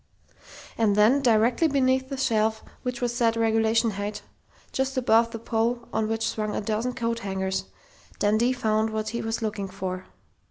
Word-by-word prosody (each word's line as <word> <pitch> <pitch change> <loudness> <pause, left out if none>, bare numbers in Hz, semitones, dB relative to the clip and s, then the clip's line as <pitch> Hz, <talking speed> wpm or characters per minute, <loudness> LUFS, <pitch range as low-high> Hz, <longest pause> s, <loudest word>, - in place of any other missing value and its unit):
And 215 -3 +3
then, 220 +7 +5
directly 235 +5 +3
beneath 260 -2 +1
the 275 - -4
shelf 220 -3 +1 0.2
which 250 -1 -4
was 240 -1 -1
set 230 -2 +2
regulation 225 0 +2
height, 205 +1 -5 0.5
just 265 0 -1
above 230 -2 +4
the 230 - -6
pole 230 +1 -1
on 220 - 0
which 225 0 -1
swung 215 -2 -2
a - - 0
dozen 220 +4 -1
coat 230 0 -1
hangers, 190 -2 -2 0.5
Dundee 215 +4 +2
found 220 -2 +1
what 215 0 -3
he 235 +2 -3
was 225 +1 -3
looking 210 -2 -2
for. 185 -1 -5
225 Hz, 165 wpm, -26 LUFS, 215-240 Hz, 0.5 s, then